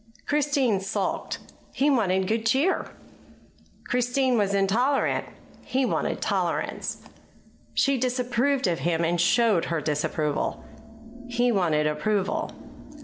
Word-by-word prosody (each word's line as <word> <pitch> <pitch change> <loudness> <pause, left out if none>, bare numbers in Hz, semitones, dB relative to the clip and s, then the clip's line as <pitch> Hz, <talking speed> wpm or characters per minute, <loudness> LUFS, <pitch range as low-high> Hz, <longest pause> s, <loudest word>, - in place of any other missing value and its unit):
Christine 280 -7 +1
sulked 195 - -2 0.4
he 285 +2 +2
wanted 190 -7 +2
good 225 +2 0
cheer; 275 +11 +1 1.0
Christine 250 +1 +1
was 200 -3 +1
intolerant 230 +8 +1 0.4
he 260 0 0
wanted - - -1
tolerance; - - -2 0.7
she 275 -2 +2
disapproved 255 +2 0
of 170 -3 0
him 170 -1 0
and 170 +1 +1
showed 210 -1 +3
her 165 -1 -1
disapproval 150 0 -2 0.6
he 245 0 +2
wanted 165 -7 +2
approval. 190 +7 0
225 Hz, 105 wpm, -26 LUFS, 180-255 Hz, 1.0 s, showed